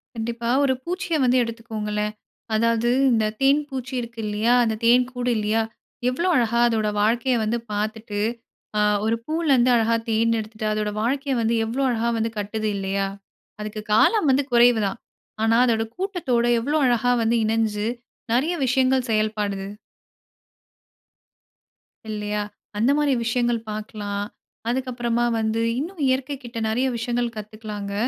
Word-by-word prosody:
கண்டிப்பா, 235 +1 -3
ஒரு 270 -2 +3
பூச்சிய 360 -1 -2
வந்து 255 0 +4
எடுத்துக்கோங்களேன். 215 -2 -3 0.4
அதாவது 230 +1 +2 0.2
இந்த 220 -2 +2 0.2
தேன் 275 +2 +4
பூச்சி 260 -1 -5
இருக்கு 235 -1 -9
இல்லையா? 215 +3 +1
அந்த 225 -2 0
தேன் 245 +2 +6
கூடு 245 -1 -1
இல்லையா? 215 +1 +1 0.5
எவ்வளோ 340 +9 -1
அழகா 235 -2 +2
அதோட 220 -2 +1
வாழ்க்கைய 240 +4 +2
வந்து 220 +2 0
பாத்துட்டு, 215 0 -3 0.6
அ - - +3 0.3
ஒரு 225 +1 +2
பூலருந்து 285 -6 +2
அழகா 230 0 +3
தேன் 230 +1 +2
எடுத்துட்டு, 215 0 -6
அதோட 210 0 -1
வாழ்க்கைய 270 +3 0
வந்து 230 +1 +1
எவ்வளோ 255 +5 -1
அழகா 235 0 0
வந்து 225 0 -1
கட்டுது 215 +1 -2
இல்லையா? 195 0 -1 0.5
அதுக்கு 215 0 -5
காலம் 320 - +4
வந்து 275 +1 +2
குறைவு 240 -1 +6
தான். 195 - -5 0.4
ஆனா 225 +1 +4
அதோட 225 -2 +2
கூட்டத்தோட 355 -12 0 0.2
எவ்ளோ 295 +5 0
அழகா 245 0 +2
வந்து 225 +1 +2
இணஞ்சு 220 -1 0 0.5
நறைய 290 +8 +2
விஷயங்கள் 260 0 +2
செயல்படுது. 210 -2 -1 2.4
இல்லையா? 210 -1 -2 0.4
அந்த 235 +6 +3
மாதிரி 295 -2 +2
விஷயங்கள் 240 0 +1
பாக்கலாம். 210 -1 -4 0.4
அதுக்கப்புறமா 240 -2 -1
வந்து 220 +1 0 0.2
இன்னும் 335 +3 -5
இயற்கை 260 +2 0
கிட்ட 240 0 -8
நெறைய 245 +4 +1
விஷயங்கள் 235 0 -1
கத்துக்கலாங்க. 210 -1 -6
230 Hz, 135 wpm, -23 LUFS, 215-250 Hz, 2.4 s, தேன்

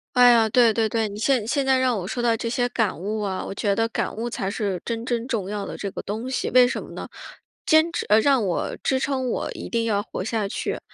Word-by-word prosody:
哎 245 0 +8
呀， 225 -2 +4
对 235 0 +5
对 225 0 +1
对， 220 0 0
你 200 - -8
现 240 -2 +1
现 275 +3 0
在 265 -1 +3
让 255 -3 +2
我 180 - -5
说 240 +4 -3
到 230 -1 +2
这 230 - -3
些 245 +1 0
感 220 -8 0
悟 210 +4 -3
啊， 195 -2 -3
我 - - -6
觉 200 0 0
得 225 0 +1
感 230 - -3
悟 235 +2 -3
才 200 -5 -3
是 200 -3 -2
真 230 0 -3
真 240 0 -2
重 205 -6 -2
要 205 -1 -3
的 - - -6
这 200 - -4
个 - - -6
东 220 +5 -4
西， 260 - -2
为 250 -1 +6
什 245 - -3
么 - - -11
呢？ - - -7 0.6
坚 315 +1 +4
持 - - -2
呃， 210 +1 +6
让 265 -1 +3
我 175 - -2
支 265 - +1
撑 260 -2 -1
我 - - -2
一 - - -7
定 230 -1 0
要 205 -3 +1
活 185 - -6
下 215 -2 -1
去， - - -3
230 Hz, 285 characters per minute, -24 LUFS, 205-250 Hz, 0.6 s, 哎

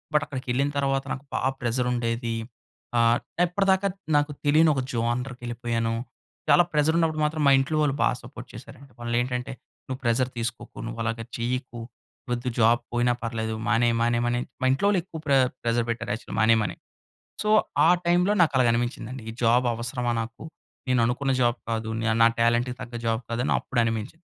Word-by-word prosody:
But, 150 - +4
అక్కడికెళ్ళిన 130 0 -1
తరువాత 135 -1 +1
నాకు 135 - -8
బా - - 0 0.2
ప్రెసర్ 125 +1 0
ఉండేది. 115 -1 -1 0.6
ఆహ్, 115 0 +4 0.3
ఇప్పటిదాకా 190 +2 +2 0.3
నాకు 145 +1 +1
తెలియని 155 +2 +5
ఒక 135 - 0
జోనర్‌కెళ్ళిపోయాను. 120 -1 -2 0.5
చాలా 175 - +7
ప్రెసర్ 150 +2 +3
ఉన్నప్పుడు 160 -2 +1
మాత్రం, 155 +1 -1
మా - - +7
ఇంట్లో 155 +4 -1
వాళ్ళు 140 -2 +1
బా - - +4
సపోర్ట్ - - -10
చేసారండి. 140 +1 -12
వాళ్ళు 120 0 -2
ఏంటంటే, 125 +1 -3 0.3
నువ్వు 130 0 -4
ప్రెషర్ 120 +2 +2
తీసుకోకు. 115 0 -5
నువ్వు 115 0 -6
అలాగా 115 0 -2
చెయ్యకు. 125 0 -3 0.5
వద్దు 120 +1 -1
జాబ్ 115 +1 +5
పోయినా 120 0 +2
పర్లేదు, 110 -1 -3
మానేయి, 120 0 +3
మానేయి, 120 0 +2
మానేయమని 120 0 +1 0.2
మా - - +1
ఇంట్లో 135 +9 0
వోళ్ళు 205 -2 +3
ఎక్కువ 165 -2 -9
ప్రె 140 -2 +3 0.3
ప్రెసర్ 120 0 +1
పెట్టారు, 115 0 -3
యాక్చువల్‌గా 110 - -6
మానేయమని. 110 -1 +3 0.7
సో, 210 - -1 0.4
ఆ - - +6 0.2
టైమ్‌లో 175 +4 +3
నాకు 160 -4 +3
అలాగా 125 -2 +4
అనిపించిందండి. 120 +1 -3
ఈ - - -4
జాబ్ 120 +2 +4
అవసరమా 120 +1 -2
నాకు. 115 +1 -8 0.4
నేను 125 -2 +3
అనుకున్న 135 +3 0
జాబ్ 120 0 +2
కాదు, 110 -1 -2 0.3
నా - - +8
టాలెంట్‌కి 120 +2 +2
తగ్గ 120 0 -8
జాబ్ 115 +1 0
కాదు, 115 +1 -1
అని - - +2
అప్పుడు 125 - -2
అనిపించింది. 115 +9 -3
120 Hz, 170 wpm, -25 LUFS, 115-135 Hz, 0.7 s, నా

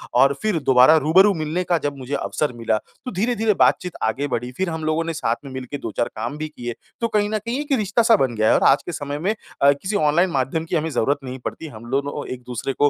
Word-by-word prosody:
और 135 +3 +5
फ़िर 215 -6 0
दोबारा 130 +4 +6
रूबरू 185 +7 +5
मिलने 160 +1 -2
का 175 -1 +1
जब 145 -3 -3
मुझे 130 +1 -7
अवसर 150 -2 -2
मिला, 115 -2 0
तो 250 - -10
धीरे-धीरे 220 +2 +1
बातचीत 180 -1 +3
आगे 130 +6 0
बढ़ी। 125 -1 -3
फ़िर 190 -1 0
हम 160 -1 -4
लोगों 155 +1 +1
ने 165 0 -3
साथ 115 -7 0
में 135 - -8
मिलके 130 +2 -6
2-4 115 -1 -2
काम 120 +7 -4
भी 155 - -4
किए, 120 -6 -6 0.3
तो 230 - +2
कहीं 210 -2 +1
न 215 - 0
कहीं 240 +4 -2
एक 295 0 -8
रिश्ता-सा 225 +2 +3
बन 130 - 0
गया 110 0 +2
है - - +5
और - - +2
आज - - +3
के - - -4
समय 145 -2 -4
में 190 +7 0 0.3
अ, 140 - +7
किसी 185 +9 -3
ऑनलाइन 170 +1 +3
माध्यम 140 +2 -1
की 165 - -3
हमें 160 0 0
ज़रूरत 140 0 +1
नहीं 130 0 -6
पड़ती 160 - -5
हम 120 -4 -11
दोनों 140 +2 -2
एक-दूसरे 125 +1 -5
को 145 +2 +3
150 Hz, 245 wpm, -22 LUFS, 130-180 Hz, 0.3 s, अ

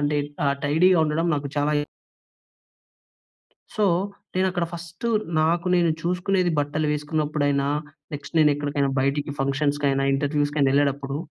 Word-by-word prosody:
అంటే 145 0 +1 0.3
ఆ! - - +3 0.2
టైడీగా 170 +5 +4
ఉండడం 165 +3 0
నాకు 145 0 -4
చాలా 145 +1 +1 2.0
సో, 215 - +1 0.5
నేను 185 +1 +2
అక్కడ 175 -2 -1
ఫస్టు 170 +6 -6 0.3
నాకు 170 +3 +1
నేను 170 -2 +3
చూసుకునేది 180 +1 +1
బట్టలు 145 +2 0
వేసుకున్నప్పుడైనా, 150 -2 0 0.5
నెక్స్ట్ 145 +3 -7
నేను 150 -2 +5
ఎక్కడికైనా 145 -1 -1
బయటికి 140 +2 -1
ఫంక్షన్స్‌కైనా, 140 0 0
ఇంటర్వ్యూస్‌కైనా 145 0 +1
ఎళ్ళేటప్పుడు 140 -1 0
150 Hz, 115 wpm, -24 LUFS, 145-170 Hz, 2.0 s, నేను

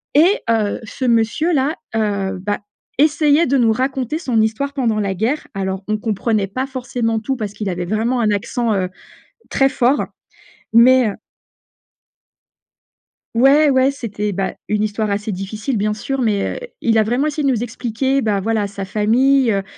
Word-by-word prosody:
et 345 +8 +5
heu, 220 -3 +1
ce 255 +3 -5
monsieur-là, 265 +6 +1 0.2
heu, 200 -3 -1
bah, 205 +2 -2 0.4
essayait 300 +1 +4
de 275 +2 +2
nous 235 -3 +4
raconter 260 +4 -1
son 250 -9 0
histoire 225 +6 -1
pendant 235 -6 0
la 200 -2 -1
guerre. 230 +10 -1
Alors 190 0 -3
on 215 0 0
comprenait 215 -1 0
pas 255 +7 -3
forcément 245 -4 -2
tout 265 +5 -2
parce 215 -5 -5
qu'il 210 0 -5
avait 175 -1 -3
vraiment 225 +6 0
un 220 - +2
accent, 220 +3 -1
heu, 185 -2 -1 0.6
très 270 - +3
fort, 265 +1 +1 0.7
mais 245 +1 +6
heu 200 - -3 2.2
Ouais, 280 +5 +5
ouais, 260 +1 +3
c'était, 210 -6 -4
bah, 195 0 -2
une 210 0 0
histoire 215 0 -1
assez 205 +1 -2
difficile, 210 +6 -3
bien 210 +1 0
sûr, 270 +5 -3
mais 210 -5 0
heu, - - -6
il 225 -1 +2
a 220 - +4
vraiment 245 +7 0
essayé 300 0 -2
de - - +3
nous 235 -2 -1
expliquer, 250 +3 -1
bah, 210 -3 0
voilà, 215 0 0
sa 200 0 -6
famille 235 +6 +3
heu, 195 -1 0
225 Hz, 170 wpm, -19 LUFS, 210-265 Hz, 2.2 s, mais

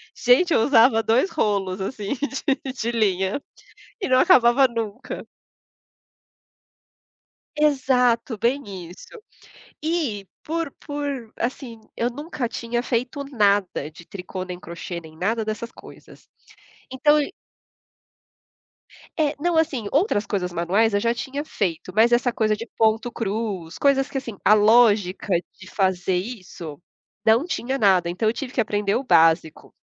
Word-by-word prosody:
Gente, 270 +8 +4
eu 225 - +4
usava 225 -3 +5
2 245 +13 +2
rolos, 200 - -1
assim, 205 +1 -3
de 275 -1 -2
de 235 -2 -2
linha, 200 +1 0 0.6
e 385 - -2
não 255 0 +5
acabava 250 +2 +5
nunca. 230 -1 -5 2.3
Exato, 255 -6 +2
bem 260 +6 0 0.3
isso. 430 - -13 0.6
E, 295 - -2 0.2
por 330 -1 -2 0.2
por 285 -6 -4
assim, 235 -2 -4 0.2
eu 235 - 0
nunca 280 -1 -4
tinha 240 +1 -3
feito 255 +4 -2
nada 205 - +1
de 165 +2 -15
tricô, 185 -1 -6
nem 180 -1 -7
crochê, 170 +1 -7
nem 160 -1 -14
nada 220 +6 -1
dessas 220 +2 -5
coisas. - - -15 0.6
Então 295 +3 +3
e 285 - -4 1.9
É, 300 -2 +1
não 340 +2 +1
assim, 280 -10 0
outras 290 - +1
coisas 180 -5 -2
manuais, 195 +6 +1
eu 205 - +3
já 230 +2 +1
tinha 275 +4 -4
feito, 185 - -3
mas 225 +3 +4
essa 245 +1 +3
coisa 215 -2 +1
de 230 - -7
ponto 225 +2 +2
cruz, 200 -6 -4
coisas 275 -1 +2
que 270 - -4
assim, 230 -6 -6
a - - +7
lógica 210 -3 +4 0.3
de 190 - -12
fazer 185 -2 0
isso 180 - -6 0.4
não 225 +6 +4
tinha 265 -6 -2
nada, 190 -6 +3
então 185 +6 -1
eu - - -1
tive 255 +1 -6
que 245 - +2
aprender 205 -2 0
o 260 - -1
básico. 165 - +2
230 Hz, 140 wpm, -23 LUFS, 200-265 Hz, 2.3 s, a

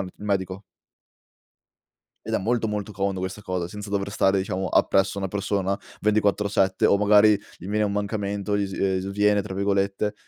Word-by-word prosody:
il 95 -1 -4
medico. 95 -1 -2 1.6
Ed - - -5
è - - +3
molto, 115 +2 0
molto 105 0 -4
comodo 95 -1 -2
questa 95 +3 -5
cosa 90 -2 -2
senza 105 +3 -8
dover 100 -1 -1
stare 95 -1 +2
diciamo 95 0 -2
appresso 95 +3 +2
una 95 - -1
persona, 100 0 -1 0.2
24/7 100 -2 +2
o - - +4
magari 105 +1 +6 0.3
gli 90 - -10
viene 105 +2 0
un 100 - 0
mancamento, 100 0 -2
gli 100 -1 -2
ehm, 95 -1 +1
"sviene" 100 +1 +1
tra 95 -2 -7
virgolette, 100 +1 0
100 Hz, 165 wpm, -24 LUFS, 95-105 Hz, 1.6 s, magari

